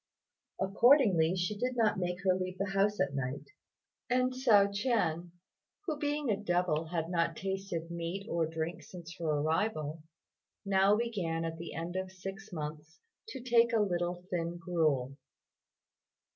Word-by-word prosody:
Accordingly, 195 - +4
she 180 +3 -1
didn't 230 -3 +1
make 180 +1 -2
her 185 -1 +4
leave 185 0 -3
the 195 0 -2
house 200 +2 +2
at 140 0 +1
night; 135 - -4 0.6
and 255 +1 +2
Hsiao 210 -6 +4
ch'ien, 200 -7 0 0.6
who 310 -5 -2
being 290 -3 0
a 200 - +1
devil 175 -4 +1
had 165 0 -2
not 170 -2 0
tasted 190 -4 -4
meat 170 +4 -4
or 170 -5 0
drink 160 +1 -4
since 170 -2 -10
her 165 - -2
arrival, 155 +1 0 0.6
now 195 +1 +4
began 190 -8 -1
at 165 0 -4
the 170 - -7
end 170 +2 -4
of 190 0 -3
six 195 +3 -8
months 155 0 -6 0.3
to 345 - -7
take 235 -1 +4
a 225 - +4
little 175 -3 -1
thin 170 -1 -2
gruel. 155 -7 0
180 Hz, 145 wpm, -32 LUFS, 165-205 Hz, 0.6 s, Accordingly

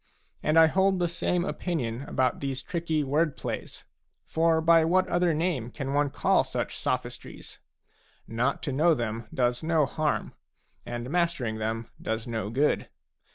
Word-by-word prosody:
And 155 +1 +2
I 165 - +9
hold 190 +4 +3
the 175 -1 +1
same 175 +1 0
opinion 130 -12 -2
about 130 -2 0
these 135 -2 -3
tricky 165 -3 -1
word 145 +2 +1
plays; - - -5 0.4
for 165 0 +2
by 165 0 +5
what 185 +3 +3
other 175 0 +2
name 155 -7 -1
can 135 +2 -4
one 145 0 +2
call - - +2
such - - -3
sophistries? - - -4 0.7
Not 120 +4 -1
to 145 - -2
know 160 +5 +4
them 115 -2 -3
does 120 -1 0
no 160 -2 +2
harm, 150 +3 -1 0.5
and 120 +2 -5
mastering 165 -11 0
them 110 +1 -2
does 110 +1 -3
no 110 -4 -3
good. 140 +6 +1
145 Hz, 155 wpm, -27 LUFS, 120-165 Hz, 0.7 s, I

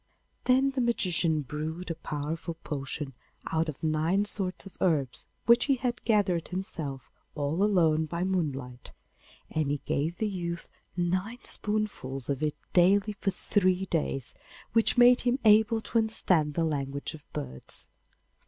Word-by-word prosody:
Then 260 +2 +4
the 270 -1 -1
magician 175 -9 +1
brewed 160 +6 -4
a - - 0
powerful 160 +1 -4
potion 140 -1 -4 0.4
out 160 0 +1
of 150 - -8
nine 160 +6 +2
sorts 195 -2 0
of 195 - -12
herbs 145 -8 +1 0.2
which 235 +1 +6
he 275 - +3
had 245 -1 -2
gathered 195 -7 +2
himself 160 -7 -5 0.2
all 150 +4 -1
alone 160 -6 +3
by 170 +3 -2
moonlight, 140 -10 -3 0.6
and 155 -3 0
he 145 0 0
gave 160 +5 -1
the 220 - 0
youth 170 -4 -4 0.3
nine 185 +7 -1
spoonfuls 195 - -3
of 140 -1 -1
it 150 -1 0 0.2
daily 195 +4 +4
for 200 0 -1
three 185 -1 +1
days, 145 -7 -1 0.4
which 225 +2 +3
made 245 +1 +7
him 250 +1 +2
able 220 +1 +6
to 230 - +1
understand 180 -9 +1
the 165 - +2
language 140 -2 -3
of 150 -2 -13
birds. 140 - -4
170 Hz, 145 wpm, -29 LUFS, 150-205 Hz, 0.6 s, made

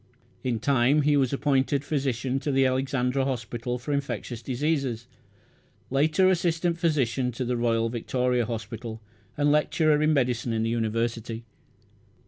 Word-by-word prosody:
In 120 -3 -1
time 140 +4 +3
he 150 0 +3
was 135 -3 +2
appointed 140 0 +1
physician 135 -3 -1
to 145 - -2
the 135 0 +3
Alexandra 130 0 0
Hospital 120 -1 -3
for 135 +4 -4
infectious 140 -4 -3
diseases; 130 -2 -1 0.9
later 155 +7 +3
assistant 170 -1 +1
physician 135 -7 +1
to 125 +2 -3
the 125 +1 0
Royal 115 -1 +1
Victoria 125 +1 0
Hospital, 115 0 -5 0.4
and 145 0 +3
lecturer 150 0 +3
in 155 +1 +3
medicine 125 -4 +1
in 110 0 0
the 115 - 0
University. 115 0 -2
130 Hz, 135 wpm, -26 LUFS, 120-145 Hz, 0.9 s, time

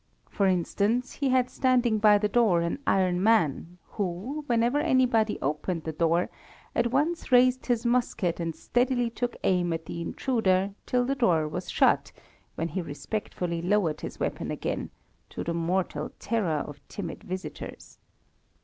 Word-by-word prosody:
For 200 - +2
instance, 200 +7 +1
he 280 -2 -1
had 255 -1 +3
standing 245 -4 +2
by 210 -1 +6
the 210 +1 +1
door 210 -6 +3
an 170 +10 -2
iron 185 -2 +2
man, 180 -5 +2
who, 205 - -4
whenever 240 +4 +2
anybody 255 -7 +2
opened 155 +4 -2
the 160 - -3
door, 165 +2 +1 0.4
at 235 0 +1
once 300 +3 0
raised 255 +1 +4
his 240 -2 0
musket 235 -8 +1
and 165 -2 -3
steadily 245 -1 0
took 245 +1 -3
aim 180 -2 +2
at 165 0 -4
the 170 - -5
intruder 195 -2 0
till 250 0 +2
the 270 - 0
door 175 - +2
was 150 - -5
shut, - - +3 0.4
when 165 - -2
he 185 +4 -2
respectfully 170 +1 -4
lowered 180 -4 +1
his - - -7
weapon - - -2
again, - - -3 0.4
to - - -5
the 170 - -2
mortal 170 -2 -1
terror 185 -10 0
of 145 -1 -10
timid 175 -5 -6
visitors. 185 +1 -7
200 Hz, 155 wpm, -27 LUFS, 170-245 Hz, 0.4 s, by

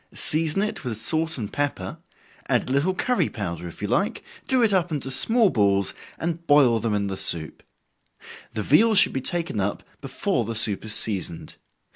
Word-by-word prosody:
Season 160 +4 0
it 215 - -5
with 120 -5 -5
salt 160 +7 -1
and 105 -5 -6
pepper 140 -10 -4 0.5
add - - 0
a - - -5
little 150 +8 0
curry 250 +6 0
powder 90 -5 -6
if 85 - -11
you - - -2
like, - - -1 0.2
do 255 -2 +2
it 215 -3 +2
up 180 -2 0
into 135 -3 -3
small 225 - +4
balls, 100 -2 +1 0.2
and 170 0 -5
boil 135 -6 +4
them 110 -1 -2
in 100 -1 -1
the 95 -1 -4
soup. 80 -4 0 0.9
The 110 - -4
veal 215 - +3
should - - +5
be 135 - -3
taken 170 - -2
up 100 +1 -3 0.2
before 135 +1 -2
the 115 +1 -5
soup 105 -2 +4
is 110 -1 +3
seasoned. 95 -7 +1
135 Hz, 185 wpm, -23 LUFS, 105-170 Hz, 0.9 s, should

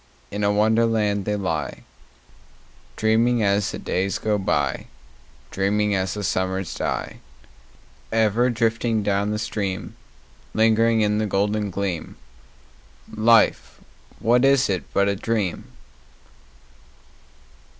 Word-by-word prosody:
In 105 +1 -3
a 100 - +3
Wonderland 105 -1 +1
they 105 - -1
lie, 80 -7 -3 1.1
Dreaming 115 +2 +2
as 100 0 +1
the - - -5
days 95 +2 -2
go 105 -1 -1
by, 70 -8 -1 0.6
Dreaming 105 +2 0
as 95 0 -1
the 105 - -4
summers 95 -1 -2
die: - - -4 0.9
Ever 115 +2 +2
drifting 115 -1 0
down 100 0 0
the 105 - -1
stream— 100 -3 -4 0.6
Lingering 115 +1 +3
in 105 0 +1
the 110 - 0
golden 105 +1 0
gleam— 95 -3 -4 1.0
Life, 110 +1 +3 0.4
what 120 +3 +2
is 135 -4 +4
it 95 - -4
but 100 0 +2
a 100 - +1
dream? 105 -3 -2
105 Hz, 110 wpm, -23 LUFS, 100-110 Hz, 1.1 s, is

